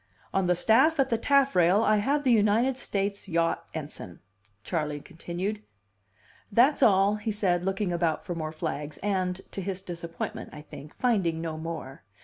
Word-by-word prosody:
"On 195 -1 +1
the 180 - +3
staff 280 - +4
at 270 -1 +3
the 230 - +2
taffrail 225 -9 +4
I 215 -1 +4
have 280 +8 +1
the 260 - +3
United 225 +4 +3
States 200 -5 -2
yacht 165 -1 0
ensign," 145 - -7 0.4
Charley 150 -1 -2
continued. 185 +5 -5 0.9
"That's 255 +9 +4
all," 200 -2 +4
he 215 +1 -3
said, 185 -4 0
looking 195 -1 -1
about 170 -1 0
for 180 - -3
more 155 -2 -4
flags, 155 -2 -4
and 185 -2 0
(to 195 - -4
his 190 0 -4
disappointment, 170 -2 -6
I 150 - -9
think) 150 0 -11
finding 195 -10 +1
no 165 -1 -4
more. 160 -4 -6
190 Hz, 160 wpm, -27 LUFS, 165-215 Hz, 0.9 s, staff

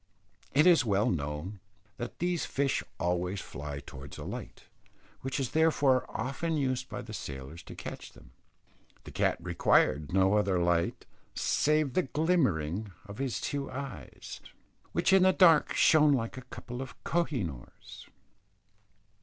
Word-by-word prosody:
It 150 - +6
is 175 -5 +6
well 105 -3 +2
known 75 +5 -4 0.4
that 120 - -6
these 175 -1 0
fish 140 -1 0 0.2
always 90 +2 -1
fly 70 -4 -6
towards 65 +1 -10
a - - -7
light, - - -7 0.6
which 135 +2 -3
is 130 -3 -2
therefore 145 -5 +3
often 160 +5 -2
used 130 -2 -1
by - - -5
the 110 0 -9
sailors 70 -2 -7
to - - -11
catch - - -8
them. - - -17 0.7
The - - -10
cat - - +1
required 75 -1 +2
no 95 +1 +3
other 100 -3 +2
light 85 -1 +1 0.3
save 150 -3 +1
the 185 - +3
glimmering 110 - 0
of 100 +3 -10
his 135 -3 -1
two 140 -1 -3
eyes, 135 -1 -8 0.5
which - - +2
in 190 - +7
the 185 0 +5
dark 165 -6 +5
shone 150 -2 +6
like 115 -4 -1
a 130 - -7
couple 125 +1 -7
of 135 - -7
koh 170 0 +1
i - - -3
noors. 65 -7 -10
125 Hz, 150 wpm, -30 LUFS, 90-150 Hz, 0.7 s, in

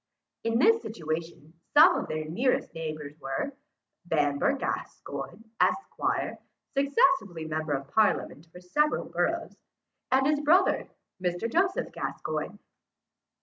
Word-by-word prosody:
In 230 0 +1
this 445 - +5
situation 160 -5 -5 0.2
some 325 +5 +8
of - - -2
their 155 0 -3
nearest 235 +12 0
neighbours 155 -2 -6
were, 135 - -3 0.5
Bamber 145 -3 +2
Gascoyne, 140 +9 -5 0.2
esquire, 390 - 0 0.4
successively 275 - +2
member 155 -1 -2
of 135 0 -3
parliament 210 -7 +1
for 180 - -11
several 300 +12 +1
boroughs, - - -1 0.6
and 265 +1 +4
his 295 +1 +3
brother, 335 +6 +3 0.4
Mr. 175 +5 0
Joseph 370 - +1
Gascoyne. - - -4
180 Hz, 110 wpm, -28 LUFS, -, 0.6 s, some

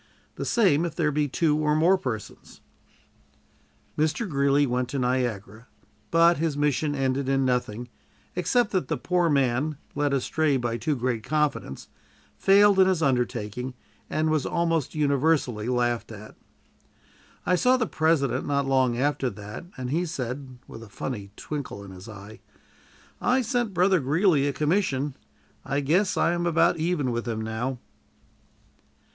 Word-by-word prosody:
The - - -5
same, 185 - +3
if 170 -2 -3
there 155 -3 +1
be 150 0 0
two 150 +2 +1
or 150 0 +2
more 170 +5 +4
persons." 120 - -6 1.3
Mr. 155 +9 0
Greeley 140 -2 +2
went 125 -1 -1
to 140 - -3
Niagara, 120 -4 -2 0.4
but 170 +1 +5
his 155 -2 -1
mission 145 0 0
ended 135 0 -1
in 135 -1 +2
nothing, 125 -2 -1 0.5
except 205 +6 +1
that 185 -9 0
the - - -1
poor 175 +6 +1
man, 140 +1 +1 0.2
led 145 0 0
astray 140 +2 +1
by 120 -2 -2
too 150 +3 -1
great 125 -2 -1
confidence, 150 - -2 0.5
failed 200 0 +5
in 190 - +6
his 180 -4 +1
undertaking, 125 -2 -1 0.3
and 155 +1 0
was 155 -3 +1
almost 165 -3 -1
universally 140 -6 +1
laughed 120 -2 0
at. 110 0 -10 1.1
I - - +2
saw 250 +8 +4
the 245 - 0
President 160 -6 +1
not 140 -1 +1
long 130 -3 +2
after 140 0 0
that, 105 - -9
and 125 -1 -4
he 175 +4 0
said, 130 -3 -5
with 115 - -10
a 115 - -12
funny 100 -1 -5
twinkle 140 -9 -6
in 100 - -11
his 95 +3 -11
eye: 105 0 -11 0.8
"I 255 +1 +2
sent 240 -1 -1
Brother 185 +1 +4
Greeley 150 +1 +2
a - - +1
commission. 150 -2 0 0.5
I 140 +1 -1
guess 170 +8 +1
I - - +3
am 175 0 -1
about 165 0 +3
even 160 -5 0
with 120 0 -3
him 110 -1 -2
now." 110 +4 -3
140 Hz, 150 wpm, -26 LUFS, 125-165 Hz, 1.3 s, in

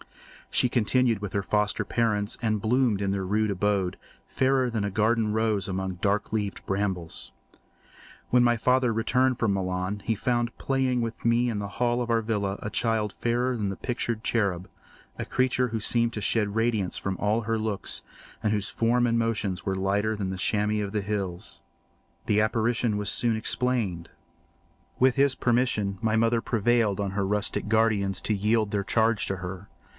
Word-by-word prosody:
She - - +5
continued 120 -1 +2
with 100 -2 -5
her 100 - -1
foster 105 0 0
parents 105 -3 0
and 110 -2 0
bloomed 115 -1 +1
in 100 -1 0
their 95 -1 -2
rude 105 +2 +1
abode, 100 -1 0 0.3
fairer 130 -1 +1
than 110 -3 -2
a 100 - -2
garden 110 +2 +1
rose 110 -3 0
among 95 -1 -3
dark 105 +1 0
leaved 105 -2 -2
brambles. 95 -4 -3 1.0
When 125 -1 +5
my 120 -1 +3
father 125 +1 +2
returned 125 +3 +1
from 110 -4 +2
Milan, 95 +1 -2
he 110 - 0
found 120 +1 -1
playing 130 -2 0
with 115 -1 -4
me 120 +1 +2
in 110 -3 -2
the 100 - -3
hall 120 0 +2
of 120 - -3
our 115 -1 +2
villa 105 -3 -2
a - - -4
child 110 -2 0
fairer 120 +2 0
than 100 -4 -2
pictured 120 -3 -2
cherub—a 95 -6 -3
creature 125 0 +1
who 115 0 -2
seemed 115 +2 +1
to - - -3
shed 105 -1 +1
radiance 110 -4 0
from 95 -1 -3
her 110 +2 0
looks 105 -3 -2 0.4
and 105 - +2
whose 105 -1 0
form 120 +2 +2
and 115 0 +1
motions 110 -5 -1
were 95 -1 0
lighter 100 +3 0
than 100 -2 -2
the 95 - -3
chamois 105 +2 0
of 100 - -4
the 105 - 0
hills. 100 -2 -4 0.6
The 105 0 +3
apparition 115 0 +1
was 105 0 +1
soon 115 +2 +2
explained. 110 -7 -1 0.9
With 130 0 +4
his 140 -1 +3
permission 115 -6 0
my 110 -1 +1
mother 115 +1 +2
prevailed 115 -3 +1
on 100 -1 -1
her 100 0 -1
rustic 105 +1 -1
guardians 110 -3 +2
to 110 - 0
yield 105 +1 +1
their 100 -1 0
charge 110 +1 +1
to 95 - -2
her. 95 +1 -7
110 Hz, 175 wpm, -26 LUFS, 100-115 Hz, 1.0 s, She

